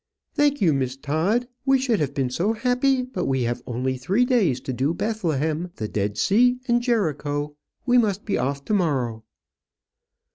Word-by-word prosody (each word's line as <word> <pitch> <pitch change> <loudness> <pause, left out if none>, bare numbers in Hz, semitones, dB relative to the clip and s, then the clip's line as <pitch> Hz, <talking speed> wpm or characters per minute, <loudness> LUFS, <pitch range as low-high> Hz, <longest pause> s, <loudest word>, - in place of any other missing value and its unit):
"Thank 290 -3 +2
you, 165 -6 +4
Miss 130 -1 -1
Todd; 165 - 0 0.2
we 270 0 +4
should 255 -5 0
have 140 -2 -2
been 130 -3 -1
so 185 - 0
happy; 255 +3 +1
but 255 0 -4
we 130 -2 +1
have 120 +1 -2
only 130 +2 -2
three 190 - +1
days 210 - +2
to 130 - -4
do 135 +7 0
Bethlehem, 170 -6 -1
the 110 - -4
Dead 105 0 -2
Sea, 245 - +3
and 240 0 +3
Jericho. 150 - -1 0.3
We 250 -1 +5
must 210 -3 0
be 210 - 0
off 140 +3 -2
to - - -1
morrow." 130 - 0
165 Hz, 175 wpm, -24 LUFS, -, 0.3 s, We